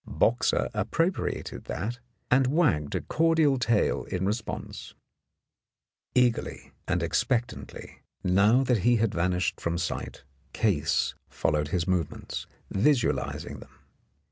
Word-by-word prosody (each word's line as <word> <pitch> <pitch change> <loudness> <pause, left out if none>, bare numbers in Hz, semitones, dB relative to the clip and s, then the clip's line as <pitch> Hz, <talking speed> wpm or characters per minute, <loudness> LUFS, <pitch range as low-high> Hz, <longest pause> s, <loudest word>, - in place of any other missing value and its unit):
Boxer 115 - +2
appropriated 165 - -1
that, 120 +4 -4 0.3
and 130 +1 +5
wagged 130 - +1
a - - 0
cordial 160 -4 +2
tail 120 -3 +1
in 90 +1 -2
response. 110 +4 -4 1.2
Eagerly 125 -2 +1 0.2
and - - 0
expectantly, 120 0 -2 0.2
now 100 +8 +4
that 125 -4 +2
he 120 +5 +4
had 115 -2 +1
vanished 90 0 0
from 85 0 -1
sight, 85 -1 -4 0.3
Case 95 -10 +1 0.2
followed 75 -2 0
his 85 +3 -1
movements, 90 -5 -2 0.2
visualizing 120 +5 0
them. - - -15
110 Hz, 110 wpm, -27 LUFS, 90-125 Hz, 1.2 s, and